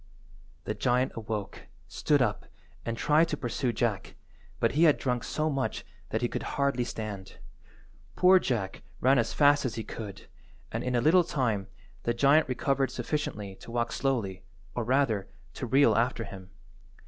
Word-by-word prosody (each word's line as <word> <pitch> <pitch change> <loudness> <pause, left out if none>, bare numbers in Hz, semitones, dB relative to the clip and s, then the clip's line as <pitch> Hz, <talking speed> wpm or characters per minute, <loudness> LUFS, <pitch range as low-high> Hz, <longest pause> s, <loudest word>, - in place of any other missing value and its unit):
The - - -2
giant 125 +4 +1
awoke, 110 -3 -5 0.2
stood 145 -3 +2
up, 110 - -2 0.4
and 115 0 -3
tried 155 +5 +4
to 150 - -3
pursue 125 0 -1
Jack, 110 -4 -2 0.4
but - - +2
he 160 +4 +4
had 150 - +5
drunk 125 -2 -1
so 155 0 -1
much 135 -4 -2 0.2
that 110 +2 -2
he - - +3
could - - -4 0.2
hardly 140 -3 +1
stand. 105 -4 -6 0.8
Poor 185 +1 +6
Jack 110 - -2 0.2
ran 130 +1 +4
as 115 - 0
fast 145 0 +4
as 125 -4 -2
he 115 - -4
could, 105 -2 -8 0.5
and, - - -3
in 125 0 -1
a 120 - +3
little 175 +7 +5
time, 120 -12 -1 0.3
the 120 - -1
giant 140 +4 +4
recovered 135 +1 +1
sufficiently 115 -7 -3
to - - -13
walk 120 0 -1
slowly, 110 -9 -1 0.3
or 120 - -2
rather, 120 -5 +1 0.3
to 125 - -5
reel 135 +4 +5
after 120 0 +1
him. 95 -2 -10
125 Hz, 165 wpm, -29 LUFS, 110-140 Hz, 0.8 s, Poor